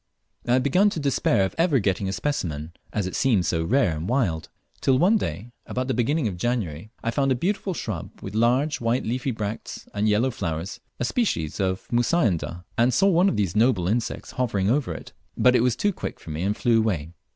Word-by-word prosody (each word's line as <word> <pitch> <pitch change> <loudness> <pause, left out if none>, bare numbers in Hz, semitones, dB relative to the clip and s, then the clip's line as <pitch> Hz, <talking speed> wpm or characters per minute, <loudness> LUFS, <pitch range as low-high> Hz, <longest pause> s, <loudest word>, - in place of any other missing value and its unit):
I 120 - +3
had 130 0 +3
begun 185 +10 +4
to 170 - -4
despair 135 -8 +2
of 95 - -4
ever 165 -4 +4
getting 95 -3 0
a - - -1
specimen, 85 - -3 0.2
as 105 -3 -1
it 95 - -4
seemed 115 -10 +2
so 80 0 0
rare 100 - +2
and 80 +5 -4
wild; 100 -12 0 0.3
till 130 -1 +3
one 185 +10 +4
day, 120 - -3 0.2
about 130 0 -2
the 130 - 0
beginning 125 +4 +1
of 95 -4 -4
January, 105 -5 -2
I 115 - 0
found 135 +1 +1
a - - +3
beautiful 190 +5 -1
shrub 100 - -4
with 95 - -7
large 125 +7 +2
white 115 +2 +1
leafy 125 +4 -1
bracts 110 -2 -5
and 105 +1 +1
yellow 115 +5 +2
flowers, 90 +1 -4 0.2
a 120 - 0
species 115 - -1
of 95 -1 -1
Mussaenda, 100 - +1
and 120 +2 +4
saw 195 - +4
one 180 +2 +4
of - - -2
these 100 -3 0
noble 110 -6 +3
insects 115 +4 -2
hovering 110 -5 0
over 140 0 +1
it, - - -8 0.2
but 125 0 +5
it - - +4
was 125 -1 +2
too 205 +9 +1
quick - - -6
for 80 - -9
me, 75 +2 -3
and 100 +3 0
flew 115 -2 +3
away. 85 -8 -1
115 Hz, 215 wpm, -25 LUFS, 95-130 Hz, 0.3 s, but